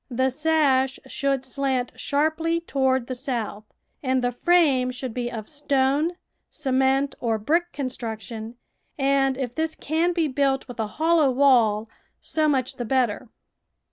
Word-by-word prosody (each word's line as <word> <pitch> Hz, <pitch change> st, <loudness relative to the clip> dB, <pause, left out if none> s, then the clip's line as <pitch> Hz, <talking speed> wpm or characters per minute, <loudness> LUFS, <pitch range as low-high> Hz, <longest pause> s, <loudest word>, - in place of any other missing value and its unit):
The 260 Hz, +1 st, +1 dB
sash 275 Hz, -3 st, +2 dB
should 275 Hz, -1 st, -1 dB
slant 260 Hz, -2 st, -1 dB
sharply 315 Hz, +3 st, 0 dB
toward 265 Hz, -6 st, 0 dB
the 255 Hz, -, -4 dB
south, 240 Hz, -5 st, -4 dB, 0.4 s
and 260 Hz, -2 st, 0 dB
the 245 Hz, -, +1 dB
frame 275 Hz, -2 st, +3 dB
should 255 Hz, -1 st, -5 dB
be 240 Hz, 0 st, -3 dB
of 220 Hz, -2 st, -6 dB
stone, 285 Hz, +2 st, +1 dB, 0.4 s
cement, 270 Hz, -1 st, +1 dB
or 225 Hz, -2 st, 0 dB
brick 335 Hz, +10 st, 0 dB
construction, 230 Hz, -3 st, -5 dB, 0.4 s
and 270 Hz, -1 st, +2 dB
if 250 Hz, -3 st, -3 dB
this 315 Hz, +3 st, -2 dB
can 325 Hz, +4 st, 0 dB
be 335 Hz, -3 st, +1 dB
built 270 Hz, -1 st, 0 dB
with 245 Hz, -2 st, -10 dB
a 220 Hz, -, 0 dB
hollow 320 Hz, -2 st, +4 dB
wall, 240 Hz, -5 st, +3 dB, 0.3 s
so 310 Hz, -1 st, 0 dB
much 265 Hz, -2 st, 0 dB
the 245 Hz, -, -3 dB
better. 240 Hz, -2 st, 0 dB
265 Hz, 140 wpm, -24 LUFS, 245-295 Hz, 0.4 s, hollow